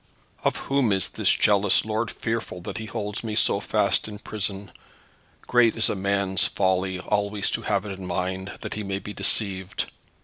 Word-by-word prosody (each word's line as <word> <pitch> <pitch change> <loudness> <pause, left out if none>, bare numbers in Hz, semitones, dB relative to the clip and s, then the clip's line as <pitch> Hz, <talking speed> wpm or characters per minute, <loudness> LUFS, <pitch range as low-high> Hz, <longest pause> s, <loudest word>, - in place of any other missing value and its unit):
Of - - +2
whom 135 -5 +1
is 95 -2 +2
this - - +1
jealous 100 -1 +4
lord 110 +1 -1
fearful 115 -6 -3
that 90 - -5
he 110 - -6
holds 105 -2 -4
me 110 -2 -3
so - - +3
fast - - +2
in 105 -1 -7
prison? 100 -1 -4 0.7
Great 120 -2 +4
is 115 - +3
a - - -1
man's 100 0 +1
folly 95 -1 +1
always 100 +1 0
to - - -1
have 100 -1 0
it 100 -2 -6
in 95 - -6
mind 95 +2 -3
that - - -4
he 105 - -4
may 100 -1 -2
be 105 +1 -7
deceived. 95 -4 0
100 Hz, 180 wpm, -25 LUFS, 95-110 Hz, 0.7 s, jealous